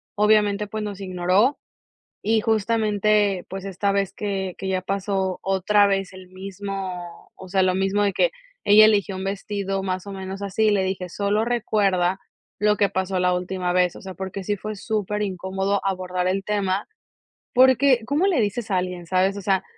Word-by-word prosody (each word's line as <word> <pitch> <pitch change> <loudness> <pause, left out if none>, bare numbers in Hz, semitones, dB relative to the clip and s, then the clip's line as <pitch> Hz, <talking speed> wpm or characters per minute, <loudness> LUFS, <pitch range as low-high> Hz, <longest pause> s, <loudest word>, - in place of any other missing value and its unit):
obviamente, 210 -1 +3
pues, 215 +1 -4
nos 205 -2 -5
ignoró, 185 +7 +1 0.6
y 220 +1 +2
justamente, 210 -3 +1
pues, 190 0 -6
esta 195 +1 -1
vez 195 -1 0
que 195 -3 -3
que 190 - -5
ya 185 -1 0
pasó 190 -1 -2
otra 195 +2 +3
vez 195 -1 -1
el 185 -1 -12
mismo 190 -2 -7
o 190 - -11
sea, 190 +1 +2
lo 185 0 +2
mismo 195 +2 +1
de 200 - +2
que, - - +2 0.4
ella 210 +1 +9
eligió 205 -2 +2
un 190 - -5
vestido 195 0 -3
más 185 0 -3
o - - -6
menos 190 +1 -6
así, 200 +2 +1
le 200 -2 +2
dije: 190 -1 -3
"Solo 205 +4 0
recuerda 195 -6 +1 0.4
lo 210 0 +3
que 200 - +3
pasó 190 0 -2
la 180 0 +2
última 180 0 -2
vez", 180 -1 +2
o - - -10
sea, 190 -1 -8
porque 190 0 -5
sí 205 +2 -1
fue 215 +2 -5
súper 210 0 -2
incómodo 190 +1 -1
abordar 185 -1 -1
el 195 +1 0
tema 200 -1 -1 0.7
porque, 260 0 +5
¿cómo 295 +8 +1
le 355 -10 +2
dices 215 +1 -2
a 190 - +2
alguien?, 180 -1 -4
¿sabes?, 190 +2 +1
o - - -7
sea, 190 0 +1
195 Hz, 180 wpm, -23 LUFS, 185-210 Hz, 0.7 s, ella